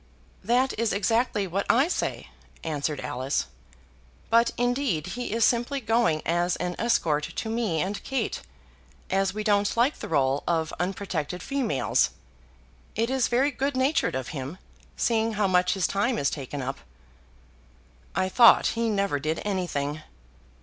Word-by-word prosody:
"That 245 Hz, +6 st, +2 dB
is 230 Hz, -1 st, +1 dB
exactly 215 Hz, +1 st, +1 dB
what 190 Hz, +2 st, -2 dB
I 265 Hz, +6 st, +5 dB
say," 360 Hz, -, -3 dB, 0.3 s
answered 150 Hz, -2 st, -2 dB
Alice. 130 Hz, +3 st, -2 dB, 0.9 s
"But, 230 Hz, +1 st, +5 dB
indeed, 245 Hz, -, 0 dB
he 245 Hz, -3 st, -4 dB
is 225 Hz, 0 st, +3 dB
simply 240 Hz, +4 st, +1 dB
going 225 Hz, -9 st, +1 dB
as 175 Hz, +1 st, +1 dB
an 180 Hz, 0 st, -3 dB
escort 165 Hz, -10 st, +2 dB
to 220 Hz, -, -5 dB
me 220 Hz, -8 st, 0 dB
and 200 Hz, +2 st, -3 dB
Kate, 265 Hz, -5 st, -2 dB, 0.7 s
as 195 Hz, 0 st, +1 dB
we 215 Hz, -, -2 dB
don't 205 Hz, 0 st, +2 dB
like 250 Hz, +6 st, +2 dB
the -, -, -6 dB
rôle 140 Hz, -3 st, +1 dB
of 165 Hz, -2 st, 0 dB
unprotected 180 Hz, -3 st, -3 dB
females. 265 Hz, -, +1 dB, 0.9 s
It 230 Hz, +3 st, 0 dB
is 265 Hz, -2 st, +2 dB
very 265 Hz, +4 st, +2 dB
good 270 Hz, +1 st, -2 dB
natured 265 Hz, -, +1 dB
of 130 Hz, -1 st, -3 dB
him, 140 Hz, +3 st, -6 dB, 0.4 s
seeing 225 Hz, -1 st, +1 dB
how 210 Hz, -1 st, +1 dB
much 180 Hz, -1 st, +3 dB
his 190 Hz, -2 st, 0 dB
time 220 Hz, +5 st, 0 dB
is 140 Hz, -, +1 dB
taken 140 Hz, -1 st, -5 dB
up." 135 Hz, +2 st, -4 dB, 1.4 s
"I 185 Hz, -, +1 dB
thought 230 Hz, +4 st, +7 dB
he 230 Hz, 0 st, 0 dB
never 200 Hz, -8 st, 0 dB
did 155 Hz, +3 st, -2 dB
anything." 155 Hz, -7 st, -2 dB
200 Hz, 150 wpm, -26 LUFS, 160-235 Hz, 1.4 s, thought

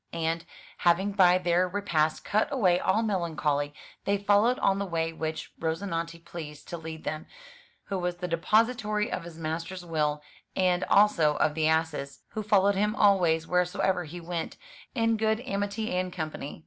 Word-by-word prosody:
And, 165 Hz, 0 st, -1 dB, 0.3 s
having 180 Hz, +4 st, +3 dB
by 185 Hz, -2 st, +5 dB
their 180 Hz, 0 st, +2 dB
repast 165 Hz, -6 st, 0 dB
cut 215 Hz, +5 st, +1 dB
away 185 Hz, -10 st, +3 dB
all 210 Hz, +5 st, +1 dB
melancholy, 160 Hz, -8 st, 0 dB, 0.3 s
they 200 Hz, 0 st, +2 dB
followed 205 Hz, +5 st, +3 dB
on 195 Hz, 0 st, +2 dB
the 200 Hz, -, -1 dB
way 165 Hz, -2 st, -1 dB
which 160 Hz, 0 st, -4 dB
Rozinante 165 Hz, 0 st, -3 dB
pleased 150 Hz, -4 st, -8 dB
to 170 Hz, -, -4 dB
lead 160 Hz, 0 st, -8 dB
them, 155 Hz, 0 st, -4 dB, 0.6 s
who 195 Hz, -2 st, -3 dB
was 180 Hz, 0 st, -1 dB
the 180 Hz, 0 st, -4 dB
depository 210 Hz, +4 st, +1 dB
of 170 Hz, -, -3 dB
his 170 Hz, -2 st, -10 dB
master's 165 Hz, +3 st, -4 dB
will, 150 Hz, -3 st, -1 dB, 0.3 s
and 180 Hz, -1 st, +2 dB
also 170 Hz, -8 st, +4 dB
of 155 Hz, 0 st, +2 dB
the 155 Hz, 0 st, +1 dB
ass's, 160 Hz, -3 st, -1 dB
who 215 Hz, -, -4 dB
followed 200 Hz, -1 st, +3 dB
him 210 Hz, +2 st, 0 dB
always 175 Hz, -6 st, +3 dB
wheresoever 180 Hz, 0 st, +1 dB
he 170 Hz, +3 st, -8 dB
went, 170 Hz, -1 st, -4 dB, 0.4 s
in 225 Hz, -2 st, +2 dB
good 220 Hz, 0 st, +1 dB
amity 205 Hz, -3 st, -2 dB
and 185 Hz, 0 st, -1 dB
company. 155 Hz, -4 st, -5 dB
175 Hz, 160 wpm, -28 LUFS, 160-200 Hz, 0.6 s, by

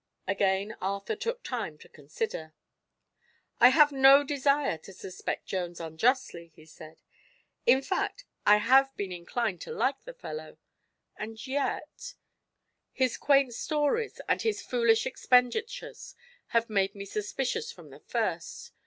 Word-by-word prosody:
Again 195 Hz, +2 st, 0 dB
Arthur 200 Hz, -, -2 dB
took 470 Hz, +3 st, -4 dB
time 220 Hz, -12 st, -4 dB
to -, -, -16 dB
consider. 155 Hz, +1 st, -6 dB, 1.0 s
"I 245 Hz, -, +9 dB
have 295 Hz, +2 st, +6 dB
no 270 Hz, +1 st, +7 dB
desire 280 Hz, -, +1 dB
to 195 Hz, -, -13 dB
suspect 185 Hz, 0 st, -5 dB
Jones 175 Hz, -2 st, -4 dB
unjustly," 170 Hz, -, 0 dB
he 155 Hz, -, -16 dB
said. 155 Hz, 0 st, -14 dB, 0.6 s
"In 265 Hz, +1 st, +5 dB
fact, 445 Hz, -, -2 dB, 0.2 s
I 210 Hz, 0 st, +6 dB
have 270 Hz, +5 st, +4 dB
been 200 Hz, -2 st, -3 dB
inclined 180 Hz, +2 st, -3 dB
to -, -, -7 dB
like 260 Hz, +4 st, -1 dB
the -, -, -9 dB
fellow. 485 Hz, -1 st, -8 dB, 0.6 s
And 220 Hz, +2 st, -7 dB
yet 285 Hz, -, -3 dB, 0.8 s
his 260 Hz, -2 st, 0 dB
quaint 275 Hz, -3 st, +3 dB
stories 305 Hz, -, -1 dB
and -, -, +1 dB
his 445 Hz, -2 st, -1 dB
foolish 235 Hz, -2 st, +2 dB
expenditures 435 Hz, -, 0 dB, 0.3 s
have 230 Hz, 0 st, +1 dB
made 195 Hz, -2 st, 0 dB
me 200 Hz, 0 st, -7 dB
suspicious 265 Hz, -, -3 dB
from -, -, -14 dB
the -, -, -13 dB
first. -, -, -3 dB
245 Hz, 135 wpm, -29 LUFS, 195-285 Hz, 1.0 s, I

